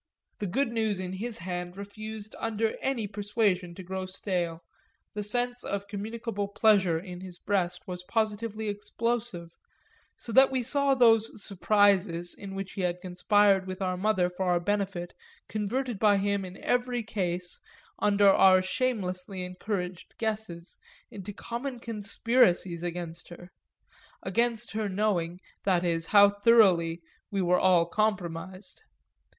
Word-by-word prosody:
The 205 - -2
good 260 +8 0
news 220 -4 0
in 185 0 -4
his 225 +4 -2
hand 180 +1 -5
refused 215 +1 -8
under 225 0 -1
any 260 -5 -1
persuasion 200 -3 -1
to 185 - -8
grow 190 +1 -4
stale, 175 -3 -3 0.5
the 210 - -3
sense 245 +4 -1
of 200 0 -3
communicable 210 0 -4
pleasure 200 -5 +3
in 180 +1 -8
his 185 -2 -9
breast 180 -3 -1
was 180 -1 -5
positively 220 +2 -2
explosive; 210 -3 -2 0.6
so 235 - -8
that 265 +4 +7
we 260 -2 -1
saw 280 +2 +2
those 225 -4 +4
"surprises" 195 -3 +2
in 195 -1 -8
which 195 0 -5
he 195 - -5
had 180 -1 -1
conspired 190 +2 +3
with 185 0 -5
our 185 -2 -1
mother 190 -1 +2
for 180 +1 -4
our 175 -1 +3
benefit 195 -2 -2 0.3
converted 225 +2 -2
by 205 -2 +5
him 200 0 0
in 185 +1 -9
every 245 -1 0
case, 180 -4 -2 0.4
under 205 -1 +4
our 190 -1 +7
shamelessly 185 -3 -2
encouraged 180 -1 -5
guesses, 215 -6 -4 0.3
into 200 0 -7
common 240 +5 -5
conspiracies 210 -5 +1
against 175 -1 -5
her 175 +1 -12 0.7
against 235 +3 0
her 215 -1 -2
knowing, 185 -4 0 0.2
that 185 -3 +2
is, 165 -2 0
how 205 -1 +7
thoroughly 200 -6 +4 0.3
we 200 -2 -2
were 180 -1 +3
all 180 -3 +4
compromised. 185 - -2
200 Hz, 140 wpm, -28 LUFS, 180-220 Hz, 0.7 s, that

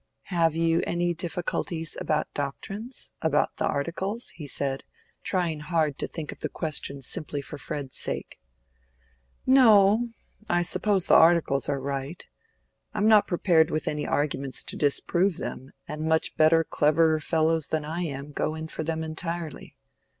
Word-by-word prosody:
"Have 165 -2 +3
you 165 0 +2
any 175 0 0
difficulties 170 -1 -3
about 155 -1 -1
doctrines—about 160 - -3
the - - 0
Articles?" 190 +10 -2
he 150 -4 -8
said, 135 -1 -2 0.4
trying 175 -5 -1
hard 155 -2 0
to - - -1
think 155 -3 -6
of - - -11
the - - -3
question 140 -4 -2
simply 150 0 -4
for 140 +1 -7
Fred's 140 -3 -5
sake. - - -4 1.1
"No; 225 -4 +6 0.4
I 175 -4 +3
suppose 195 +1 +1
the - - +3
Articles 160 -5 +5
are 140 -1 0
right. 140 +4 -4 0.7
I - - -4
am 210 - +3
not 215 -2 +6
prepared 170 -3 +3
with 155 - -2
any 150 0 -1
arguments 140 -2 -1
to - - -5
disprove 170 +5 +1
them, 130 - -5 0.2
and 150 0 -5
much 160 0 +1
better, 160 +1 +5
cleverer 155 +1 +3
fellows 160 0 +1
than 155 -1 -1
I 165 +3 -3
am 145 -3 -4
go 155 +2 -1
in 160 0 -6
for 160 - -4
them 160 0 -2
entirely. 165 0 -5
160 Hz, 150 wpm, -27 LUFS, 150-175 Hz, 1.1 s, No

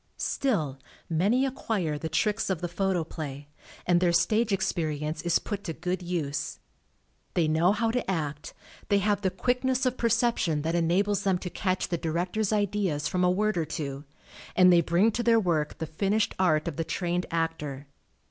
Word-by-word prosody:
Still, 155 - -1 0.3
many 205 +11 +2
acquire 210 - -2
the 160 - -4
tricks 210 +8 0
of 190 -4 0
the 175 - -2
Photoplay, 160 -6 -3 0.4
and 175 0 +3
their 175 -1 +3
stage 220 +6 +2
experience 155 -5 -1
is 175 0 +2
put 205 -2 -5
to 165 - -3
good 180 +3 -3
use. 155 - -3 0.8
They 170 -3 +3
know 160 +4 +3
how 225 +2 +1
to 245 -4 -2
act. 150 -5 -3 0.3
they 200 - +4
have 205 +1 +1
the 190 - +1
quickness 255 +5 0
of 255 0 0
perception 230 -10 +1
that 165 +1 -1
enables 180 +4 +2
them 190 -2 +2
to 180 0 -6
catch 185 -1 -1
the 170 - -1
director's 180 +6 -1
ideas 200 -8 0
from 180 0 0
a 180 - +4
word 205 0 +1
or 160 - 0
two, 140 -2 -5 0.5
and 185 -1 +7
they 170 - +6
bring 175 +7 +3
to 235 - -2
their 230 -1 +4
work 160 -7 0
the 160 - -3
finished 195 +7 0
art 155 -5 +2
of 165 - -4
the 165 - 0
trained 175 +1 -2
actor. 160 -4 -2
180 Hz, 175 wpm, -27 LUFS, 160-205 Hz, 0.8 s, and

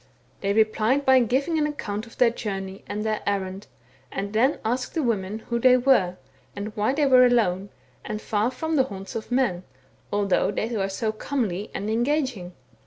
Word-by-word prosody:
They 200 - -1
replied 220 +6 +2
by 265 0 +6
giving 270 +7 +1
an 300 - +2
account 220 -7 -4
of 230 - -16
their 240 -2 +5
journey 195 -4 -5
and 210 +1 -3
their 215 -1 -1
errand, 195 0 -2 0.4
and 200 +1 -4
then 255 +7 +3
asked 250 +7 -2
the 320 - +1
women 215 -2 -2
who 235 - +1
they 255 +1 +6
were, 240 -9 +3 0.4
and 205 +1 -6
why 210 +4 +1
they 300 - +1
• - - +4
were 255 -1 +7
alone, 205 -6 +2 0.3
and 210 - -4
far 215 +1 0
from 320 +5 -2
the 265 - +4
haunts 195 -5 -8
of 225 +2 -6
men, 245 -9 +1 0.5
although 200 -2 +2
they 225 +3 -2
were 195 -2 0
so 215 +3 -1
comely 215 -5 -3
and 205 - -3
engaging. 240 - -1
220 Hz, 185 wpm, -25 LUFS, 200-255 Hz, 0.5 s, were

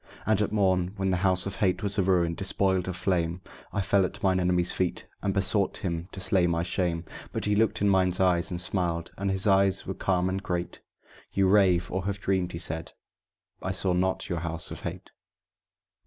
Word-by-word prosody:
And 110 -1 +2
at 105 - 0
morn, 95 -3 +1
when 95 -1 0
the 90 - +1
House 90 -1 +3
of 100 0 -5
Hate 95 +1 +1
was 100 0 +1
a - - +5
ruin, 90 -3 +2
despoiled 95 0 0
of 95 - -3
flame, 90 -2 0 0.3
I 100 - -1
fell 95 0 +3
at 95 - -4
mine 95 -1 +3
enemy's 90 -1 +1
feet, 90 -1 -2 0.2
and 100 - 0
besought 95 0 +1
him 85 -1 -4
to - - -8
slay 95 -2 +3
my 85 -1 0
shame; 85 -1 -1 0.3
But - - -3
he 105 0 +2
looked 110 0 +1
in - - +4
mine 95 -2 +3
eyes 90 -2 +2
and 90 - -4
smiled, 85 -2 -1
and 100 0 -2
his 95 +1 0
eyes 95 -2 +3
were - - -3
calm 90 -1 0
and 95 +1 -2
great: 90 -2 -3 0.5
"You 95 -1 +2
rave, 95 -3 +3
or 95 0 -2
have 100 0 -2
dreamed," 95 -3 0
he - - -4
said; 80 -1 -4 0.7
"I 95 - -2
saw 95 -1 0
not 95 +1 0
your 85 - -2
House 85 0 -5
of - - -7
Hate." - - -7
95 Hz, 210 wpm, -27 LUFS, 90-95 Hz, 0.7 s, a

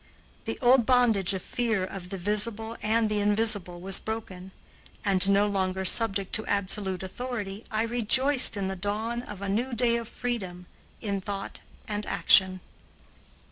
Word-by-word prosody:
The - - -4
old 245 -1 +5
bondage 235 -7 +3
of 185 - -6
fear 225 -5 -1
of 185 -1 -9
the 195 - -5
visible 210 +4 -1
and 220 +1 +1
the 210 -1 -1
invisible 205 -4 +3
was 190 +1 +1
broken 195 -4 -6 0.6
and, 195 -1 +3
no 200 +1 +4
longer 190 -2 -2
subject 200 -2 +2
to 220 - +4
absolute 195 -2 -2
authority, 210 -1 -6
I 220 0 -1
rejoiced 245 +2 +2
in 195 - -2
the 190 0 -3
dawn 215 +5 -3
of 205 -5 -9
a - - -3
new 235 +6 -1
day 235 0 +2
of 230 -1 -6
freedom 190 -8 -5 0.4
in 200 -3 -3
thought 195 0 -6 0.3
and 210 -1 -3
action. 185 -1 +4
205 Hz, 155 wpm, -27 LUFS, 190-230 Hz, 0.6 s, old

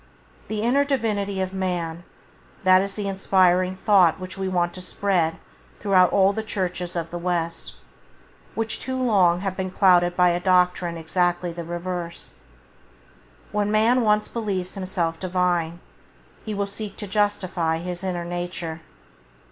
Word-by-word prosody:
The 215 0 -3
inner 265 +5 +3
Divinity 210 -8 -1
of 190 0 -3
man, 175 -3 -3 0.6
that 185 0 +6
is 195 0 -4
the 205 -2 -3
inspiring 185 -1 +2
thought 190 -4 +4
which 185 0 -7
we 195 -1 -3
want 175 -1 0
to 185 - -8
spread 180 -3 0 0.4
through 200 -2 -2
all 190 +2 +5
the 220 - -2
Churches 180 -4 -3
of 165 -1 -3
the 175 - -4
West, 170 -1 -3 0.8
which 225 -1 -2
too 260 0 -3
long 190 -8 +3
have 195 -1 -2
been 190 0 -3
clouded 180 -2 +4
by 180 -1 +5
a 175 0 +1
doctrine 180 -2 +2
exactly 175 +1 0
the 170 0 -6
reverse. 175 0 -5 1.2
When 210 0 0
man 225 +4 +3
once 210 -1 +2
believes 195 -6 -3
himself 175 -4 -2
Divine, 175 -2 0 0.6
he 215 -1 -4
will 200 0 0
seek 200 0 -7
to 210 - -5
justify 185 -5 0
his 175 +2 -5
inner 175 -2 -2
nature. 175 -2 -5
185 Hz, 150 wpm, -24 LUFS, 175-200 Hz, 1.2 s, that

